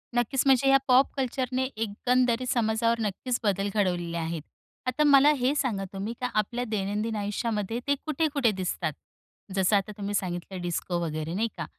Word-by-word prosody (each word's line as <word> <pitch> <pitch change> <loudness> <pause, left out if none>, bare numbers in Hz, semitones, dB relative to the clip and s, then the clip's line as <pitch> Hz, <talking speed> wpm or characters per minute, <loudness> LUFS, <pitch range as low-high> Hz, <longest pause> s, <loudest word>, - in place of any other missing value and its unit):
नक्कीच. 240 +2 +1
म्हणजे 270 0 +4
ह्या 270 - +7
पॉप 255 +2 +5
कल्चरने 260 0 -1
एकंदरी 245 +3 +1
समाजावर 230 -1 +1
नक्कीच 225 +4 -2
बदल 200 -1 +1
घडवलेले 175 -4 0
आहेत.आता 170 - -4
मला 285 0 +7
हे 255 +3 +3
सांगा 240 -9 0
तुम्ही 200 +4 -4
का 250 - 0
आपल्या 235 +4 0
दैनंदिन 210 +2 -1
आयुष्यामध्ये 210 +1 -2
ते 285 - +3
कुठे-कुठे 295 -6 +1
दिसतात. 180 -5 -2 0.6
जसं 190 +2 +3
आता 200 +1 0
तुम्ही 205 0 -3
सांगितलं 180 0 -3
डिस्को 175 0 -2
वगैरे 155 0 -3
नाही 220 +5 +1
का, - - -3
220 Hz, 155 wpm, -27 LUFS, 195-255 Hz, 0.6 s, ह्या